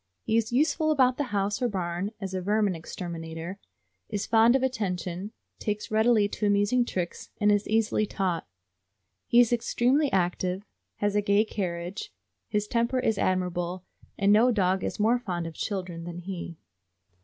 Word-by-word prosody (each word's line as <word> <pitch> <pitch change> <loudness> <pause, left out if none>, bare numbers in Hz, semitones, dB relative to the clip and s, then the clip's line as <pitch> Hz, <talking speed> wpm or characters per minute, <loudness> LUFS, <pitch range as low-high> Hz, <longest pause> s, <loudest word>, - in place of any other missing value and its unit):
He 220 - 0
is 230 0 +1
useful 310 +4 +2
about 255 -4 +3
the 290 - 0
house 205 0 -1
or 245 - +3
barn 180 -1 -2
as 190 -2 -5
a 185 - -2
vermin 205 +1 +2
exterminator, 165 +1 -6 0.5
is 205 -2 -2
fond 230 +2 +5
of 265 - +2
attention, 195 -5 -2 0.3
takes 210 0 -3
readily 220 -1 +4
to 210 +1 -2
amusing 205 +5 +3
tricks, 180 -6 -4
and 210 -1 +4
is 205 0 +1
easily 215 -1 +1
taught. 185 - -2 0.8
He 235 - +5
is 245 -1 +5
extremely 255 +5 +2
active, 185 +1 0 0.3
has 205 0 -1
a 210 - +3
gay 205 +1 +3
carriage, 180 -2 -4 0.4
his 210 0 -1
temper 235 +3 +1
is 225 -5 +1
admirable, 180 0 -1 0.3
and 200 0 +4
no 230 +4 +5
dog 190 -5 +1
is - - -3
more 230 +4 +3
fond 180 -7 -3
of 165 - -6
children 180 -2 -4
than 175 0 -6
he. 175 -2 -6
205 Hz, 165 wpm, -27 LUFS, 180-225 Hz, 0.8 s, fond